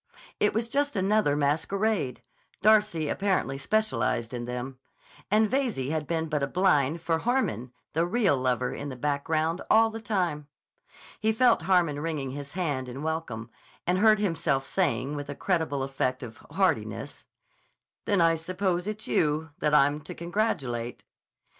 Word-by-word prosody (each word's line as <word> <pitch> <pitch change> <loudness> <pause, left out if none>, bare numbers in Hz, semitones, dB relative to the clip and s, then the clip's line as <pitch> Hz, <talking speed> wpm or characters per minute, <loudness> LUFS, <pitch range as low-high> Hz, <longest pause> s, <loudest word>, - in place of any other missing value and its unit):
It 210 - +2
was 225 +1 0
just 285 +3 0
another 195 -5 +2
masquerade—Darcy 170 - 0
apparently 185 -7 0
specialized 135 - 0
in 120 -1 -4
them—and 130 - -3
Veyze 225 - -1
had 155 -2 -2
been 165 -1 -1
but 150 -2 -1
a 140 - +1
blind 160 -3 +2
for 165 -1 +1
Harmon, 160 - -1 0.2
the 165 +2 +1
real 195 -5 +2
lover 130 -1 0
in 145 - -5
the 130 - -6
background, 155 +5 -1
all 225 +1 +5
the 225 0 -7
time. 175 -9 -1 0.7
He 220 +1 +2
felt 245 -3 +4
Harmon 170 -4 +2
wringing 150 -4 -3
his 140 +1 -7
hand 145 -8 -2
in 135 +4 -7
welcome 125 -8 -4 0.3
and 180 +1 +1
heard 215 +1 +6
himself 165 -9 0
saying 130 +5 0
with 145 -1 -6
a 145 - -4
creditable 160 -7 0
affect 130 -1 -2
of 115 -2 -9
heartiness: - - -1 0.8
"Then 200 -4 +2
I 165 0 +4
suppose 180 +2 -1
it's 215 +3 -5
you 155 -3 +1
that 150 0 +2
I'm 145 +1 +4
to 150 - -9
congratulate." 145 - -2
160 Hz, 145 wpm, -27 LUFS, 140-200 Hz, 0.8 s, heard